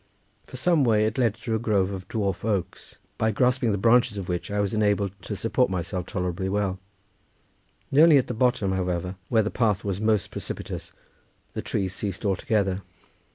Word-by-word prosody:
For 130 - -8
some 165 +2 +3
way 110 -3 +3
it 110 +5 -1
led 115 -4 +2
through 110 0 -2
a - - -5
grove 100 -4 +1
of 95 -1 -6
dwarf 100 -4 -2
oaks, 100 -5 -3 0.2
by 110 - +2
grasping 125 +1 +2
the 100 - 0
branches 120 +1 +3
of 95 -3 -5
which 90 -1 -3
I 105 0 -1
was 100 0 0
enabled 105 -2 +1
to 105 - -5
support 115 +5 +1
myself 90 -1 -3
tolerably 90 -1 -2
well; 95 -2 -1 1.1
nearly 150 +2 +7
at 130 - +2
the - - -4
bottom, 115 -4 +1
however, 90 -1 -1 0.2
where 110 -2 +3
the 110 - -2
path 105 -5 +1
was 100 -1 -2
most 110 -2 +1
precipitous, - - -6 0.6
the - - -3
trees 95 -2 -2
ceased 100 +1 -4
altogether. 100 0 0
105 Hz, 180 wpm, -25 LUFS, 95-115 Hz, 1.1 s, nearly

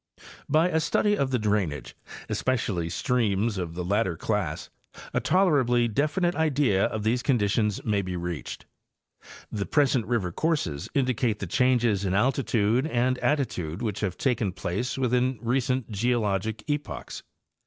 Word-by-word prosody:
By 160 +5 +4
a 160 - +1
study 205 +6 +2
of 140 -9 0
the 130 - +1
drainage, 100 - -1 0.3
especially 105 -10 -1
streams 105 0 0
of 85 -2 -4
the 90 - -3
latter 100 -3 0
class, 100 -7 -2 0.4
a - - +2
tolerably 135 -11 +3
definite 150 - +1
idea 140 - +2
of 110 -1 -3
these 120 +3 +1
conditions 105 -5 +1
may 105 -3 +1
be 90 -1 -4
reached. 85 -2 -5 0.9
The 100 -4 -3
present 135 - +2
river 110 -7 0
courses 95 - -1
indicate 125 -5 +1
the - - -4
changes 120 -6 +2
in 95 -1 0
altitude 120 +1 +2
and 125 -2 +1
attitude 110 - -1
which 105 -3 -2
have 95 -4 -2
taken 115 -8 0
place 100 +8 -3
within 125 0 +1
recent 125 +1 -1
geologic 110 -1 -1
epochs. 145 -1 -4
115 Hz, 140 wpm, -26 LUFS, 100-130 Hz, 0.9 s, By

